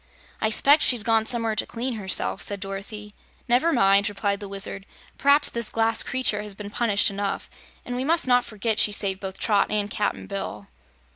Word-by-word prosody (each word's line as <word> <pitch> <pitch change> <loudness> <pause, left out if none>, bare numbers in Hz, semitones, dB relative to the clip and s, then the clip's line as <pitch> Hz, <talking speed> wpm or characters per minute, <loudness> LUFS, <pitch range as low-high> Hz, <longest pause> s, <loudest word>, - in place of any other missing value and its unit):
"I 220 - +1
s'pect 285 +7 +4
she's 245 -5 +4
gone 225 -1 +1
somewhere 230 -3 0
to - - -1
clean 245 +2 -4
herself," 195 -4 -2
said 200 -1 +1
Dorothy. 205 +2 -7 0.3
"Never 255 +8 +2
mind," 200 -5 +3
replied 200 0 -2
the 205 -1 -8
Wizard. 195 0 -2 0.3
"Perhaps 285 +1 +4
this 235 -2 0
glass 225 0 +1
creature 255 -5 -1
has 210 -1 -7
been 205 0 -8
punished 210 -3 +1
enough, 200 0 -4 0.3
and 245 - -5
we 250 - -2
must 325 +1 +2
not 245 -1 +4
forget 215 0 -2
she 210 - +5
saved 195 -2 -2
both 190 -1 -7
Trot 205 -3 +1
and 210 -1 -1
Cap'n 210 - -2
Bill." 105 - -6
210 Hz, 190 wpm, -24 LUFS, 200-235 Hz, 0.3 s, she